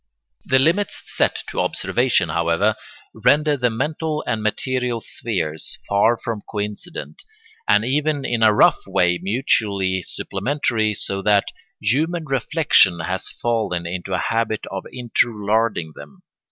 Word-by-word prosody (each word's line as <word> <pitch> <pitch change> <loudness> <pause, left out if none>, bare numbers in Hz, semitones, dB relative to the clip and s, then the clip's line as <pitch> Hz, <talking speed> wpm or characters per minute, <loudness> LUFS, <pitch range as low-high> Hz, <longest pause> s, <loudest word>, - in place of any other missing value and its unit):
] - - -43
The 130 - +6
limits 170 +10 +1
set - - 0
to - - -4
observation, 120 -9 +1
however, 85 +7 +1 0.4
render 150 0 +3
the 125 -3 +1
mental 150 +6 -2
and 115 -3 -1
material 125 +2 -1
spheres 85 -10 -4
far 105 +4 +3
from 110 -3 -4
coincident, 105 -8 -5 0.5
and 105 +1 +4
even 145 +2 0
in 120 -3 -1
a 110 -1 +6
rough 105 - +3
way 90 -2 +2
mutually 100 -4 0
supplementary, 110 - -1
so 95 0 -3
that 100 0 +3 0.3
human 155 +10 0
reflection 135 - +3
has 90 +3 -2
fallen 110 -7 -2
into 90 +2 -3
a - - +1
habit 115 +1 -1
of 95 -1 -5
interlarding 110 -7 0
them. 70 0 -13
110 Hz, 130 wpm, -21 LUFS, 95-130 Hz, 0.5 s, The